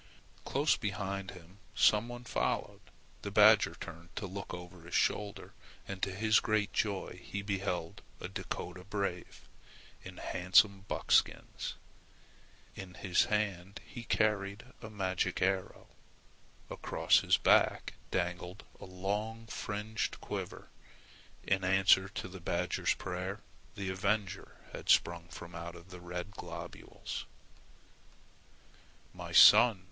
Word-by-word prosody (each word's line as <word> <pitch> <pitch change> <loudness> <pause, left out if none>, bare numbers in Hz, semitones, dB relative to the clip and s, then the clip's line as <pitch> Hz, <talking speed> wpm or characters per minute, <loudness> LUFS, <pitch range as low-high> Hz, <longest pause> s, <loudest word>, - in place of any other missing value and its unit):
Close 145 +3 +2
behind 95 -1 -3
him 90 +2 -13 0.2
some 105 +2 +4
one 120 0 -8
followed. - - -2 0.4
The - - -4
badger - - +6
turned 85 +1 -10
to 105 - -3
look 100 +1 -6
over 90 0 -9
his 85 +1 -6
shoulder 100 -1 0 0.3
and 95 -1 -6
to 95 - 0
his 110 +3 +3
great 110 -2 0
joy 100 -3 -2
he 100 0 -5
beheld 95 -4 -3 0.2
a - - -5
Dakota 90 -1 -6
brave 100 -3 -4 0.6
in - - -10
handsome 95 +2 +3
buckskins. - - +1 1.0
In 95 -1 -9
his 90 -3 +2
hand 100 -3 -2
he 120 - -8
carried 105 -3 0 0.2
a 110 - -8
magic 95 -3 -1
arrow. 95 0 -1 0.9
Across - - +2
his - - +3
back - - +3 0.2
dangled 90 +1 -3 0.2
a - - -9
long 105 +5 -3
fringed 110 0 -3
quiver. - - -6 0.7
In 95 -1 +1
answer 95 0 +4
to 95 - -5
the 95 0 -10
badger's - - 0
prayer, 95 +3 -5 0.3
the 95 -1 -3
avenger 100 +1 -2 0.2
had - - -8
sprung 85 0 +3
from 85 0 -10
out 85 +1 -7
the 90 -1 -10
red 90 +2 -5
globules. - - -7 1.9
"My - - -8
son!" 115 -5 +8
95 Hz, 120 wpm, -32 LUFS, 90-105 Hz, 1.9 s, son